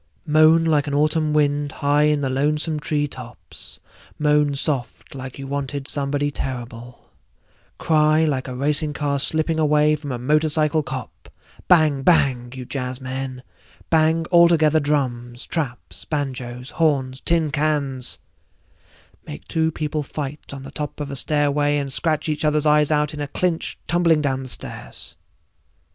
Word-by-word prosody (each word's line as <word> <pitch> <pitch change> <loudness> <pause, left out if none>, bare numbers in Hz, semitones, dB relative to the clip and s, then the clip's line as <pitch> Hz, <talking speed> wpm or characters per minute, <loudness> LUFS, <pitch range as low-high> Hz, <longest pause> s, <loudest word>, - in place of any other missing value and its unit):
Moan 155 +1 +5
like 150 -2 +2
an 145 - -1
autumn 155 +1 +2
wind 145 -1 +1
high 145 0 +2
in 150 -1 +2
the 135 - -1
lonesome 150 +3 0
tree 150 0 0
tops, 125 -4 -6 0.4
moan 150 -1 +2
soft 135 -3 -2
like 130 -1 -8
you 135 - -7
wanted 140 0 -4
somebody 145 0 -1
terrible, 120 -3 -7 0.7
cry 155 0 +3
like 135 -4 -1
a 130 - -5
racing 150 +3 0
car 145 -1 -1
slipping 160 +2 0
away 150 0 +3
from 145 -2 -7
a 125 - -2
motorcycle 155 +3 +2
cop, 135 -4 -8 0.4
bang 155 -6 +4
bang! 135 -6 +3
you 130 -1 -7
jazzmen, 130 0 -5 0.5
bang 160 0 +3
altogether 165 -3 +5
drums, 125 -4 -2
traps, 140 -7 -4
banjoes, 130 -4 -4
horns, 135 -5 0
tin 165 -3 +1
cans—make 145 -4 -1 1.3
two 160 -1 +1
people 155 0 -2
fight 145 0 -6
on 140 -1 -8
the 135 - -9
top 150 0 -5
of 145 -1 -4
a - - -4
stairway 145 0 +1
and 140 -2 -3
scratch 160 +1 0
each 150 -1 -1
other's 150 0 +2
eyes 150 -1 +4 0.2
in 150 - -5
a 145 - -2
clinch 170 +2 -2
tumbling 170 -2 +3
down 135 -2 0
the 130 - -7
stairs. - - -7
145 Hz, 145 wpm, -22 LUFS, 135-155 Hz, 1.3 s, Moan